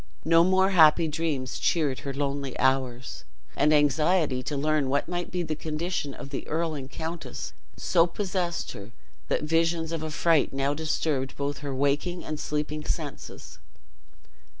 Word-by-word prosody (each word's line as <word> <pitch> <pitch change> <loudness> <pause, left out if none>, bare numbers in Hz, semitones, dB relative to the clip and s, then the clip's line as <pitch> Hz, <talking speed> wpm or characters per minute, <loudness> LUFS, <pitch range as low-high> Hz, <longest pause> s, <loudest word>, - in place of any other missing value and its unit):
No 165 +1 +6
more 190 +2 +3
happy 165 -2 +6
dreams 150 -4 -2
cheered 150 -6 +1
her 140 - -4
lonely 140 -1 -2
hours; 130 -2 0 0.3
and 150 - +3
anxiety 150 -1 +3
to 145 +3 -3
learn 150 -1 +1
what 140 +1 +1
might 175 0 -3
be 180 -1 -2
the 155 -2 -2
condition 155 -1 -3
of 140 - -9
the 140 - -5
earl 165 +1 -1
and 135 -3 -6
countess 165 +3 -6 0.2
so 170 -1 +3
possessed 180 -2 -2
her 100 +2 -9 0.4
that - - 0
visions 165 +1 +1
of 165 -2 -3
affright 155 0 +2
now 135 +1 0
disturbed 150 -3 -1
both 140 0 -2
her 140 -2 -4
waking 145 +6 0
and 155 -1 -4
sleeping 150 0 -2
senses. 150 -4 -6
155 Hz, 150 wpm, -27 LUFS, 140-165 Hz, 0.4 s, No